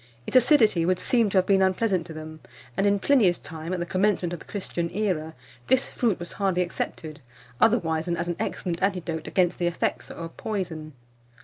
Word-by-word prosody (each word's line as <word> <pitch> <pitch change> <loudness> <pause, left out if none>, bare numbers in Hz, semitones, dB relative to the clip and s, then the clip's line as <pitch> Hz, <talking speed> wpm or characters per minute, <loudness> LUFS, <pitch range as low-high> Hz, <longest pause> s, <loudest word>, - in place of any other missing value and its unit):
Its - - -6
acidity 240 - +5
would 180 +2 +2
seem 230 0 +2
to 195 - 0
have 185 - +4
been 195 -1 +3
unpleasant 190 -1 +1
to - - -9
them; 155 0 -8 0.4
and 200 - +2
in 200 0 +3
Pliny's 200 -5 +3
time, 160 +1 -8
at 185 - -1
the 175 - -2
commencement 185 -1 +1
of 175 - -5
the - - -13
Christian 175 -4 -3
era, 175 -5 -2 0.3
this 260 0 +2
fruit 225 -6 +1
was 175 - -7
hardly 190 -3 +1
accepted, 160 -2 -5 0.4
otherwise 165 -9 +2
than 170 -1 -1
as 170 +1 -2
an 175 - -1
excellent 180 -5 -3
antidote 175 -5 -1
against 180 -2 +1
the 175 - +1
effects 175 - -2
of 165 0 -8
poison. 165 -7 -4
180 Hz, 195 wpm, -26 LUFS, 165-205 Hz, 0.4 s, acidity